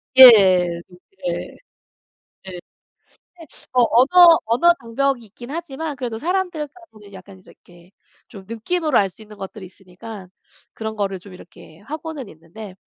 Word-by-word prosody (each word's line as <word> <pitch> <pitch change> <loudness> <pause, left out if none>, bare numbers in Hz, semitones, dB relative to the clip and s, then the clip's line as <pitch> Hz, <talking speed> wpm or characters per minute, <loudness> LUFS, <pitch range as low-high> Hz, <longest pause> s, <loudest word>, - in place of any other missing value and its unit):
예예. 185 -9 +7
누 180 - -17 0.3
예. - - 0
예. - - -12 0.9
근데 185 -2 -9 1.1
어 250 - +4
언어, 330 +7 +6
언어 245 +10 +3
장벽이 240 +1 -2
있긴 240 +4 -13
하지만 320 -2 -5
그래도 240 -4 -5
사람들하고는 325 - -5
약간 190 0 -13
이렇게 175 +1 -20 0.4
좀 195 -2 -13
느낌으로 300 +7 -1
알 195 -1 +2
수 200 - -17
있는 210 -1 -14
것들이 195 0 -9
있으니까 190 +2 -12 0.5
그런 220 -1 -6
거를 195 -2 -3
좀 185 +1 -15
이렇게 175 -2 -16
하고는 300 0 -8
있는데 180 +5 -12
220 Hz, 300 characters per minute, -20 LUFS, 190-285 Hz, 1.1 s, 예예